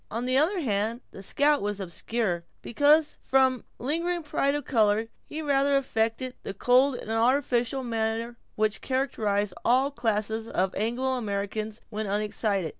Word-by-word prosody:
On 230 +3 -3
the 255 +1 +1
other 330 +8 +3
hand, 220 -1 -1
the - - -10
scout 290 +9 +2
was 205 0 -2
obscure; 185 0 -2 0.2
because 295 +5 +3
from 260 -2 +2
the - - -12
lingering 335 +5 -1
pride 285 -1 0
of 290 -2 -3
color, 220 -2 +2 0.2
he 315 +1 -5
rather 280 -1 +3
affected 250 0 -1
the 195 - -6
cold 250 +5 +4
and 220 - -6
artificial 245 +2 +1
manner 230 0 -2 0.2
which 215 -1 0
characterizes 210 -7 0
all 260 +4 +3
classes 220 -2 -1
of 190 -3 0
Anglo 240 +5 -1
Americans 215 0 -3
when 215 0 -3
unexcited. 205 -3 -1
230 Hz, 150 wpm, -27 LUFS, 210-270 Hz, 0.2 s, cold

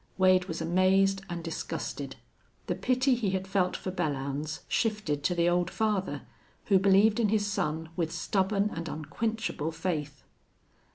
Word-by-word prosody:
Wade 185 -1 +5
was 165 -3 -5
amazed 190 +3 +3
and 170 -1 -4
disgusted. 165 -1 -4 0.5
The - - -1
pity 255 +1 +2
he 235 -5 0
had 190 0 -7
felt 190 -2 +1
for 185 - -4
Belllounds 150 -3 -2
shifted 210 - 0
to 180 - +2
the 170 0 +2
old 175 0 +2
father, 210 -3 -1 0.4
who 195 -2 +4
believed 200 +3 +4
in 220 -3 +3
his 210 -1 +2
son 160 -5 -2
with 165 -3 -1
stubborn 195 +4 0
and 165 0 -4
unquenchable 165 +1 -3
faith. 155 -4 -3
185 Hz, 150 wpm, -29 LUFS, 165-205 Hz, 0.5 s, Wade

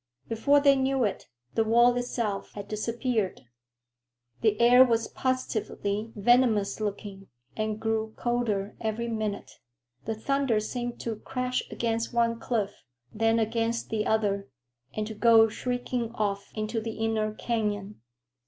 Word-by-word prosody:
Before 280 +6 +3
they 280 -1 +5
knew 265 -1 +1
it, 205 - -2 0.3
the 225 - +2
wall 240 +2 +5
itself 235 -4 -2
had 205 -1 -7
disappeared. 225 -1 -1 1.0
The 215 -2 +2
air 245 +2 +8
was 230 -3 +1
positively 220 -4 -2
venomous 220 -1 +3
looking, 200 -2 -5 0.3
and 215 0 -2
grew 220 0 -1
colder 225 -5 -1
every 225 +1 -2
minute. 215 -3 -4 0.5
The 225 - -2
thunder 270 0 +1
seemed 240 +2 -4
to 225 -2 -3
crash 250 +3 -2
against 230 0 -2
one 230 -1 +2
cliff, 215 -5 -2 0.3
then 225 +1 +2
against 230 +1 -1
the 215 -1 0
other, 200 -4 0 0.4
and 215 - -3
to 220 - -6
go 225 +1 +6
shrieking 245 0 -3
off 200 -2 -2
into 220 +1 -2
the 225 0 -4
inner 220 -1 0
canyon. 210 - -2
225 Hz, 135 wpm, -28 LUFS, 215-240 Hz, 1.0 s, air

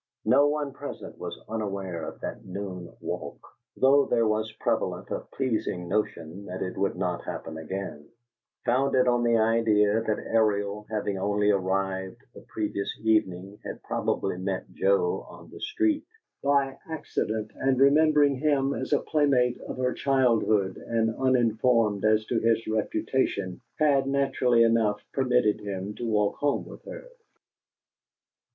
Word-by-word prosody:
No 140 +3 +5
one 145 -2 -1
present 145 +1 -8
was - - -6
unaware 100 -6 -3
of - - -15
that - - -5
noon 90 -2 -6
walk, - - -5 0.4
though 140 +1 +5
there 115 -1 +2
was 110 0 0
prevalent - - -2
a - - -1
pleasing 110 -9 -3
notion 95 -2 -2
that 90 0 -4
it 90 - -5
would 100 0 0
not 90 -1 -2
happen 80 - -6
again, 80 -2 -6 0.6
founded 130 +1 +3
on 120 -1 +3
the 115 -1 +3
idea 110 -1 +3
that 110 -2 -1
Ariel, 105 -2 +1
having 105 -3 -2
only 105 +1 +2
arrived 95 +2 -1
the - - -12
previous 105 -2 -3
evening, 100 -3 0
had - - -7
probably 90 - -1
met 95 0 -3
Joe 95 -2 +1
on - - -13
the - - -11
street 330 -7 0 0.4
by 140 -1 +2
accident, 110 -8 -3
and, 135 -1 0
remembering 145 0 +5
him 140 -1 +1
as - - -2
a 145 - +3
playmate 135 -5 +2
of - - -5
her 125 0 0
childhood 115 -8 +2
and 115 -1 0
uninformed 115 -4 +2
as 110 0 +3
to 115 - 0
his 115 0 +2
reputation, 110 -3 -1 0.2
had, 140 -3 +3
naturally 130 -3 +3
enough, 115 -3 +2
permitted 125 -5 +2
him 100 0 -5
to 120 - -5
walk 105 -1 +1
home 145 -1 0
with - - -12
her. - - -9
110 Hz, 145 wpm, -27 LUFS, 100-130 Hz, 0.6 s, No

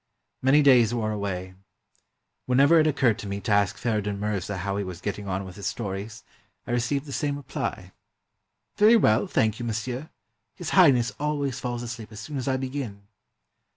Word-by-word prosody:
Many 140 +3 +5
days 120 -4 +5
wore 110 -2 -1
away. 95 -3 -4 0.9
Whenever 140 +6 +5
it 155 - +4
occurred 130 -7 +2
to 105 - -6
me 100 0 -3
to 110 - -3
ask 100 -2 +2
Feridun 105 -4 -1
Mirza 100 -2 -2
how 100 +2 -2
he 100 - -1
was 90 -2 -7
getting 100 +1 -4
on 95 0 -2
with 95 0 -10
his 100 - -4
stories, 105 0 -5 0.4
I - - -5
received 120 +4 0
the 140 - -9
same 145 +1 -1
reply 145 - -5 0.4
— - - -51
"Very 215 +3 +7
well, 110 - +3
thank 110 -1 +1
you, 120 - -4
monsieur. 120 +6 -4 0.5
His - - -5
Highness 125 -3 +5
al 150 0 0
ways 140 -2 -2
falls 120 -1 -4
asleep 115 -2 -7
as 105 - -9
soon 145 +7 -6
as 130 - -4
I 130 -1 +1
begin." 130 -6 -5
115 Hz, 190 wpm, -26 LUFS, 100-135 Hz, 0.9 s, Very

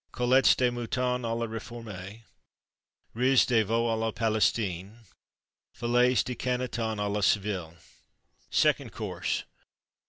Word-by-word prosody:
Côtelettes 125 +2 +4
de 125 -1 +2
Mouton 125 +1 -1
à 115 0 -1
la 115 - -1
Réforme. 110 -2 -8 0.9
Riz 130 +2 +4
de 115 -3 +3
Veau 115 +3 0
à 115 - +1
la 110 0 -1
Palestine. 105 -3 0 0.8
Filets 125 +2 +2
de 125 - -3
Canneton 125 -3 -2
à 105 - 0
la 105 +1 -1
Séville. 95 -5 0 0.7
SECOND - - +2
COURSE. - - -3
115 Hz, 120 wpm, -28 LUFS, 105-125 Hz, 0.9 s, Côtelettes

